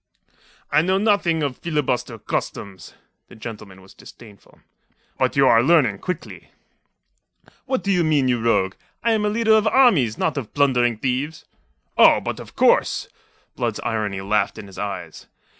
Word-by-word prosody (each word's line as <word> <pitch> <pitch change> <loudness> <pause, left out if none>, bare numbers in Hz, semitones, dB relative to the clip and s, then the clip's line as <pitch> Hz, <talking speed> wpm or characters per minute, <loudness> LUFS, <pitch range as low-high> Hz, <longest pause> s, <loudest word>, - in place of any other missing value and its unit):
"I 150 - +4
know 185 +3 +1
nothing 195 -6 +1
of 140 -3 -3
filibuster 150 -7 -2
customs." 95 -2 -5 0.3
The - - -15
gentleman 105 -4 -10
was 95 - -17
disdainful. 105 -4 -16 0.6
"But - - +1
you - - +4
are 115 - +5
learning 130 - +3
quickly." 180 -3 -6 1.2
"What 260 -1 -1
do 200 - 0
you 180 -3 +2
mean, 150 -4 +2
you 120 -2 0
rogue? 95 -5 +1 0.3
I 235 - +2
am 215 -1 +1
a - - +1
leader 220 +1 +2
of 220 0 +3
armies, 205 - +3
not 155 - -1
of 125 -6 -6
plundering 125 -5 +2
thieves." 135 +6 -3 0.5
"Oh, - - +7
but - - -5
of - - -12
course!" - - +2 0.5
Blood's - - -2
irony 110 -5 -2
laughed 100 +1 0
in - - -8
his 95 -1 -12
eyes. 100 -1 -6
130 Hz, 160 wpm, -21 LUFS, 110-175 Hz, 1.2 s, Oh